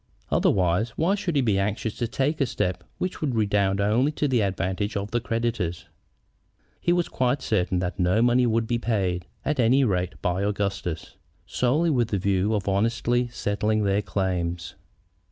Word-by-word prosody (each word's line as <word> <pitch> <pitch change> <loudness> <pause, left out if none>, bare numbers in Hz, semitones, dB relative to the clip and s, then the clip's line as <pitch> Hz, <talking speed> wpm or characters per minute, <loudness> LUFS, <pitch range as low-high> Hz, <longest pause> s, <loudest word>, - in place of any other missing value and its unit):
Otherwise, 90 +4 +2
why 175 +5 +2
should 190 -5 -2
he 140 - +3
be 105 -5 +2
anxious 105 +2 -2
to 120 - -2
take 140 +6 -1
a 135 - +3
step 90 -6 -2
which 185 - -3
would 140 -6 -1
redound 100 -2 +1
only 115 +8 +2
to 150 -1 -1
the 125 -4 +2
advantage 95 +1 -1
of 100 +1 -4
the 120 0 0
creditors? 115 -8 -2 0.9
He 175 - +1
was 175 -1 +2
quite 130 +2 0
certain 90 -4 0
that 90 +2 -3
no 90 +4 +2
money 120 +1 +4
would 115 0 +1
be 120 +1 -1
paid, 95 -7 -1 0.2
at 150 -2 0
any 125 +4 +4
rate, 90 -6 -1
by 90 0 -1
Augustus, 100 -5 -3 0.3
solely 150 +7 +1
with 120 -5 +2
the 105 - -1
view 100 +2 +1
of 100 -2 -3
honestly 115 +4 +1
settling 105 -1 -1
their 100 0 +2
claims. 90 -4 -2
105 Hz, 170 wpm, -25 LUFS, 95-120 Hz, 0.9 s, money